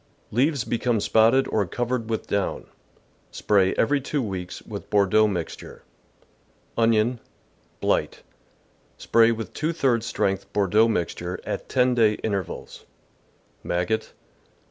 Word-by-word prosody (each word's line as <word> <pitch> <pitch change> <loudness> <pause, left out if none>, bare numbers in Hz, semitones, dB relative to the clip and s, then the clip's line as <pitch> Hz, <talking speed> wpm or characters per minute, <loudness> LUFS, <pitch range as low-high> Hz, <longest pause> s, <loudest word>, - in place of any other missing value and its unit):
— - - -38
Leaves 135 +3 +1
become 120 -1 0
spotted 115 +6 +3
or 105 - +1
covered 120 +2 -2
vi^ith 110 -1 -3
down. 100 -2 -2 0.6
Spray 95 -3 +2
every 140 +4 +2
two 145 +2 -2
weeks 95 -4 -5
with - - -8
Bordeaux 105 +1 +4
mixture. 90 -5 -6 0.9
Onion. 115 +1 +2 0.3
— - - -38
Blight. - - 0 0.4
— - - -38 0.3
Spray 115 0 +4
with 115 -1 -5
two 155 +2 -1
thirds 125 -8 0
strength 95 -3 -1
Bordeaux 105 +3 +3
mixture 90 -3 -2
at - - -5
ten 125 -1 +3
day 110 -3 +4
intervals. 100 -5 -4 0.8
Maggot. 90 +6 -2
110 Hz, 125 wpm, -24 LUFS, 100-120 Hz, 0.9 s, Bordeaux